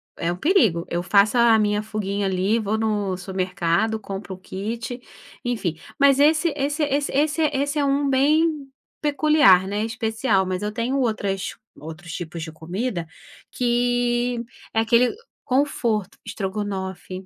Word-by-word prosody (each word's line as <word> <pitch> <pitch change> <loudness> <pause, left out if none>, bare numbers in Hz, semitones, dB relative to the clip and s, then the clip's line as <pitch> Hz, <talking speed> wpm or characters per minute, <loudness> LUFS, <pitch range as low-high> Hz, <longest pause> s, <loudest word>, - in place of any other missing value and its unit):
é 170 +1 -1
o 175 - -4
perigo, 220 - +2
eu 175 0 -2
faço 205 +5 +3
a 230 -2 +6
minha 210 0 +1
fuguinha 205 -2 -2
ali, 190 +5 +1
vou 215 +1 -1
no 205 -4 -1
supermercado, 185 +3 -1
compro 195 -1 -6
o - - -14
kit, 230 +6 -5 0.4
enfim. 220 -9 -2 0.2
Mas 275 -1 +5
esse 310 +2 +4
esse 290 +3 -1
esse 285 0 0
esse 300 +3 +1
esse 285 +2 -1
é 285 - +2
um 280 +1 +1
bem 290 +1 +2 0.3
peculiar, 290 -10 +5
né, 205 +2 -1
especial, 220 -3 0
mas 185 +1 -3
eu 210 0 -2
tenho 240 +5 -1
outras 200 -5 -1 0.2
outros 160 +2 -9
tipos 165 -1 -6
de 160 - -7
comida, 175 +3 -4 0.4
que 245 0 0 0.3
é 225 - +2
aquele 235 - +3 0.3
conforto, 235 -7 0
estrogonofe. 190 -2 -5
220 Hz, 145 wpm, -23 LUFS, 190-265 Hz, 0.4 s, a